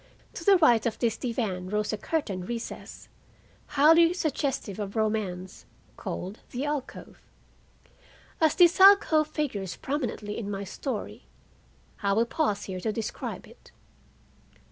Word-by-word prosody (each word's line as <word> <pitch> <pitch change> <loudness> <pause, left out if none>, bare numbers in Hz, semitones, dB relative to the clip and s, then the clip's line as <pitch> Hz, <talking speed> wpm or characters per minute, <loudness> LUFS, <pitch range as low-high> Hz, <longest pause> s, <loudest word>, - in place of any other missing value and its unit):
To - - -7
the 395 +2 +6
right 240 -10 +4
of 225 - -3
this 230 -2 0
divan 215 -8 -3
rose 210 +1 -1
a - - -1
curtained 200 - -3
recess, 235 -1 -7 0.6
highly 325 +4 +5
suggestive 280 - -2
of 200 0 -5
romance, 205 -4 -2 0.3
called 190 +4 -6
"the 255 +3 -3
alcove." 295 -3 -5 1.2
As 315 -1 +4
this 350 0 +5
alcove 380 -6 +7
figures 250 - -3
prominently 245 -7 -3
in 205 -3 -5
my 200 -1 -4
story, 220 +4 -6 0.7
I 200 -1 +1
will 225 +3 +3
pause 235 -5 -1
here 185 -1 -5
to 220 +4 -1
describe 215 0 -5
it. - - -18
230 Hz, 130 wpm, -27 LUFS, 205-300 Hz, 1.2 s, alcove